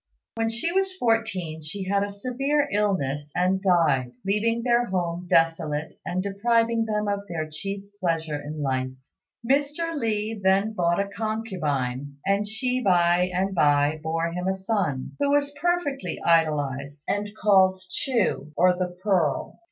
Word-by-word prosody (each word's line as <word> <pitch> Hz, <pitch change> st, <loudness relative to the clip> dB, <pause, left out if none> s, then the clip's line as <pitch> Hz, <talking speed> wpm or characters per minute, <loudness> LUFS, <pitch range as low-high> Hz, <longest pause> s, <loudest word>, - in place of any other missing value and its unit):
When 225 Hz, 0 st, 0 dB
she 235 Hz, +9 st, -1 dB
was 385 Hz, 0 st, +1 dB
fourteen 220 Hz, -, 0 dB
she 175 Hz, +6 st, -5 dB
had 200 Hz, +1 st, +1 dB
a 205 Hz, -, -3 dB
severe 260 Hz, +8 st, 0 dB
illness 150 Hz, -9 st, 0 dB
and 185 Hz, +2 st, +2 dB
died, 155 Hz, -10 st, +2 dB
leaving 225 Hz, +4 st, +1 dB
their 240 Hz, 0 st, +3 dB
home 175 Hz, -1 st, -2 dB
desolate 165 Hz, -2 st, +1 dB
and 185 Hz, +1 st, -2 dB
depriving 230 Hz, +3 st, +1 dB
them 210 Hz, -1 st, -1 dB
of 200 Hz, 0 st, -2 dB
their 160 Hz, -3 st, -3 dB
chief 195 Hz, +6 st, -5 dB, 0.2 s
pleasure 160 Hz, -5 st, -1 dB
in 150 Hz, +1 st, -5 dB
life. 130 Hz, -1 st, 0 dB, 0.6 s
Mr. 290 Hz, +5 st, +1 dB
Li 220 Hz, -4 st, -2 dB
then 195 Hz, +3 st, +3 dB
bought 175 Hz, -3 st, +1 dB
a 200 Hz, -, 0 dB
concubine, 155 Hz, -, -3 dB
and 200 Hz, +1 st, +1 dB
she 250 Hz, +4 st, -1 dB
by 180 Hz, -3 st, +3 dB
and 190 Hz, +2 st, 0 dB
by 145 Hz, -2 st, +3 dB
bore 165 Hz, +1 st, -1 dB
him 180 Hz, +2 st, -3 dB
a 190 Hz, -, +1 dB
son, 190 Hz, -, -1 dB
who 285 Hz, 0 st, +2 dB
was 285 Hz, 0 st, +2 dB
perfectly 350 Hz, -6 st, -1 dB
idolised, 145 Hz, -4 st, +1 dB
and 205 Hz, +2 st, -1 dB
called 190 Hz, -2 st, +4 dB
Chu, 225 Hz, -, 0 dB
or 180 Hz, +1 st, +5 dB
the 180 Hz, 0 st, -3 dB
Pearl. 180 Hz, -9 st, 0 dB
190 Hz, 150 wpm, -25 LUFS, 160-225 Hz, 0.6 s, or